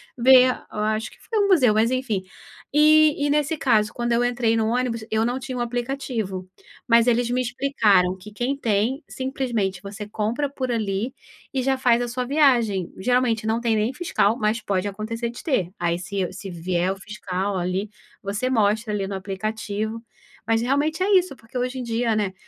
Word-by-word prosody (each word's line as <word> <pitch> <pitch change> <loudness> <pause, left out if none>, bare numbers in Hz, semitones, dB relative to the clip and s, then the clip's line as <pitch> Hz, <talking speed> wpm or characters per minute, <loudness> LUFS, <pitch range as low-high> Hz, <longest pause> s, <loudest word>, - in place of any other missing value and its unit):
ver, 255 +1 +7
a - - -9
eu - - -4
acho 215 +1 -1
que - - -19
foi 445 - -2
um 405 - +3
museu, 275 - +5
mas 220 +2 +3
enfim. 255 -6 -1 0.5
Eh, - - +3 0.5
e - - +1
nesse 300 +2 +1
caso, 220 -6 +2
quando 240 0 -2
eu 235 +1 +3
entrei 240 -2 +1
no 220 -1 +1
ônibus, 235 -1 -1
eu 220 0 +1
não 245 +2 -1
tinha 260 -1 -5
o - - -2
aplicativo, 240 -6 -3 0.4
mas 230 0 +5
eles 240 0 +2
me 250 +1 +1
explicaram 225 -8 +2
que 200 +3 -12
quem 245 +6 -1
tem 235 +2 0
simplesmente 240 -9 -2
você 200 +1 -7
compra 220 +7 -1
por 265 -2 -4
ali 220 +1 -1 0.4
e 265 -2 0
já 265 +1 +1
faz 245 -2 +3
a 245 - -1
sua 250 +1 -2
viagem. 240 - +2
Geralmente 235 0 +1
não 225 +1 0
tem 235 -1 +1
nem 215 +5 0
fiscal, 235 - +1
mas 215 +1 0
pode 195 -2 -1
acontecer 225 +4 -4
de 235 - -9
ter. 195 - 0
Aí, 170 0 0
se 185 +1 -3
se 195 +1 -8
vier 175 +1 -1
o 195 - -5
fiscal 195 -1 -4
ali, 185 +3 -2 0.3
você 205 +6 -2
mostra 215 -2 +1
ali 200 -2 -1
no 195 - -4
aplicativo, 215 +3 -4 0.4
mas 225 0 +2
realmente 290 +7 0
é 390 +1 +5
isso, 365 -4 0
porque 230 +3 -9
hoje 250 +1 -2
em - - -4
dia, 230 0 0
né, 200 -3 -1
230 Hz, 195 wpm, -23 LUFS, 205-255 Hz, 0.5 s, ver